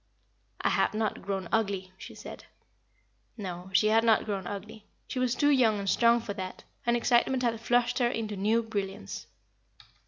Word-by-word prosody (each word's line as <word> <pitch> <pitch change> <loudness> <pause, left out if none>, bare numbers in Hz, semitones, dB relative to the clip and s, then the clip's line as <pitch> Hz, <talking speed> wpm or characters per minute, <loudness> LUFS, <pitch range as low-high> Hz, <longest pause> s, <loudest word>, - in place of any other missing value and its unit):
"I - - +2
have - - +1
not 215 -1 -1
grown 195 -2 -3
ugly," 195 -4 0
she - - -11
said. - - -10 0.9
No, 185 -3 -6
she 215 +3 +4
had 225 +1 +4
not 225 -2 +4
grown 195 -3 -3
ugly. 205 +1 -8 0.2
She 255 - -3
was 255 -1 +1
too 290 0 +3
young 235 -6 +4
and 200 -1 -4
strong 235 +3 +4
for 205 - -5
that, 185 -2 -6 0.2
and 235 0 +4
excitement 250 +2 +2
had 230 -2 0
flushed 245 +2 +2
her 240 -1 +3
into 220 -3 -3
new 215 +4 +2
brilliance. 195 - -5
220 Hz, 175 wpm, -29 LUFS, 195-235 Hz, 0.9 s, she